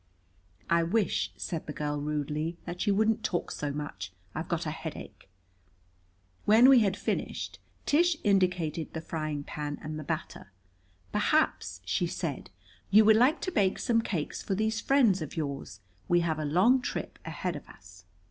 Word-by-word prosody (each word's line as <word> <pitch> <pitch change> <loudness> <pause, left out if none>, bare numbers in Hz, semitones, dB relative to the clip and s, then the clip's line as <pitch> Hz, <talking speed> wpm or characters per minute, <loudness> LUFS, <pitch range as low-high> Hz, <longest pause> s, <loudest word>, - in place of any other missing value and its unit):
"I 170 0 +3
wish," 195 +5 +1
said 165 -3 -4
the 150 - -4
girl 150 -1 -2
rudely, 150 +2 -2
"that 175 +5 -4
you 200 - +4
wouldn't 220 +1 +2
talk 175 - -1
so 145 -1 -3
much. 120 -12 -5 0.2
I've 160 - -4
got 170 0 -1
a 155 - -1
headache." 155 - -8 1.2
When 225 +5 +7
we 265 -2 +8
had 200 -3 +1
finished - - -3 0.3
Tish 335 +2 +3
indicated 180 -5 +1
the 160 - -3
frying 155 -3 -3
pan 145 0 -5
and 155 0 -5
the - - -6
batter. 155 - -5 0.6
"Perhaps," - - +1
she - - 0
said, - - -4 0.4
"you 215 +2 +7
would 220 0 +7
like 255 +8 +4
to 370 - -2
bake 195 - +2
some 230 -1 +2
cakes 175 -9 -3
for 195 - -2
these 220 +2 0
friends 235 -10 +3
of 155 - -6
yours. 140 -3 -4 0.3
We 175 0 +4
have 160 -2 -1
a 155 - -2
long 195 - +4
trip - - -4
ahead 170 +2 -3
of 145 - -9
us." 90 -1 -16
170 Hz, 165 wpm, -29 LUFS, 150-215 Hz, 1.2 s, we